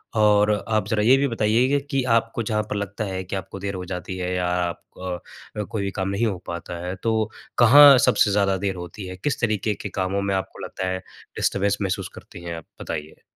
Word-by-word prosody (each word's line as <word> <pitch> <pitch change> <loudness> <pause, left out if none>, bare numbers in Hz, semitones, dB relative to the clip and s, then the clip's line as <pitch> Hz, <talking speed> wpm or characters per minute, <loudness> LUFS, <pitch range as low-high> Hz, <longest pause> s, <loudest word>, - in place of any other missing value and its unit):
और 105 -1 +4 0.2
आप 110 -1 +1
ज़रा 105 -1 +1
ये 130 +4 +6
भी 140 +1 +2
बताइएगा 115 +4 +2
कि 135 -3 +1
आपको 115 0 -2
जहाँ 105 -1 0
पर - - -2
लगता 100 +2 -3
है 95 -1 -3
कि 95 - -5
आपको 95 +1 -6
देर 100 +1 -3
हो 90 - -5
जाती 95 +1 -5
है 90 0 -2
या 90 0 0
आप 90 -1 -1 0.8
अ, - - 0
कोई 110 0 -4
भी 100 - -2
काम 95 - 0
नहीं 100 +4 0
हो 100 -5 -1
पाता 85 0 -5
है 90 +1 -3
तो 110 -1 +1 0.3
कहाँ 135 +3 +9
सबसे 105 - +4
ज़्यादा 100 -1 +2
देर 95 0 -2
होती 90 +3 -7
है? 90 0 -7
किस 135 +8 -2
तरीकें 105 -2 0
के - - -4
कामों 95 +1 -1
में 100 -1 0
आपको 95 - -4
लगता 95 - -4
है 95 0 -1 0.4
डिस्टरबेंस 100 0 +1
महसूस 95 -1 -1
करती 85 - -11
हैं 85 -1 -4
आप 80 - -10 0.2
बताइए? 75 -1 -6
100 Hz, 220 wpm, -23 LUFS, 95-110 Hz, 0.8 s, कहाँ